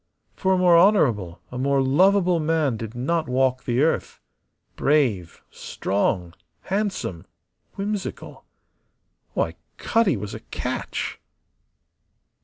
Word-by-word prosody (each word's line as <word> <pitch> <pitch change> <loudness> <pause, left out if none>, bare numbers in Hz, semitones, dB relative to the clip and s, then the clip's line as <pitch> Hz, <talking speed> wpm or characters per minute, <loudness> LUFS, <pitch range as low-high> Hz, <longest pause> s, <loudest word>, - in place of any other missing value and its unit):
For 190 0 +1
a - - +2
more 175 -2 +6
honourable, 115 - +2
a 125 - -5
more 140 +1 +2
lovable 180 +6 +3
man 155 -5 +1
did 110 +1 -7
not 160 +7 -1
walk 130 0 +1
the 125 +3 +1
earth. 160 - -1 0.6
Brave, 120 - +1
strong, 95 -3 -2 0.3
handsome, 190 - -3 0.5
whimsical 200 0 -5 0.9
why, - - 0 0.2
Cutty 225 - +2
was 100 +1 -6
a - - -6
catch! - - -4
140 Hz, 105 wpm, -23 LUFS, 115-185 Hz, 0.9 s, more